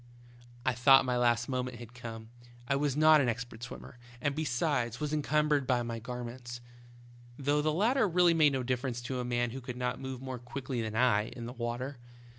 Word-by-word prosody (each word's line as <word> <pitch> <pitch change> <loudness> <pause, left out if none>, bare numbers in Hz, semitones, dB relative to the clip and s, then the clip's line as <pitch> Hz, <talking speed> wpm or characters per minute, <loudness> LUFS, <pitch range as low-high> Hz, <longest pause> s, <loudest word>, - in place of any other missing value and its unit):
" 120 0 -22
I 130 - +3
thought 135 +3 +6
my 125 -1 0
last 120 -1 +2
moment 125 -2 -2
had 120 0 -11
come, 115 -2 -8
as 120 - -20 0.2
I 140 - +3
was 140 -1 0
not 155 0 +7
an 125 - +2
expert 120 0 -5
swimmer, 125 0 -9 0.2
and 145 +3 0
bevsides 125 -5 0
was 150 -1 -2
incum 150 0 +1
bered 145 -3 +1
with 120 -2 +2
my 115 -1 -4
garments, 120 +1 -7 0.8
though 145 +1 +1
the 155 +1 +1
latter 220 - +3
really 175 0 +4
made 155 -3 +4
no 130 -1 -1
difference 125 0 -2
to 130 +1 -3
a - - -1
man 120 -1 0
who 135 +2 -6
could 125 0 -6
not 125 0 -2
move 130 -1 -5
more 130 -1 -6
quickly 125 0 -4
than 110 -1 -4
I 110 -3 +3
in 120 - -8
the 120 - -6
water. 120 +2 -4
125 Hz, 215 wpm, -31 LUFS, 120-140 Hz, 0.8 s, not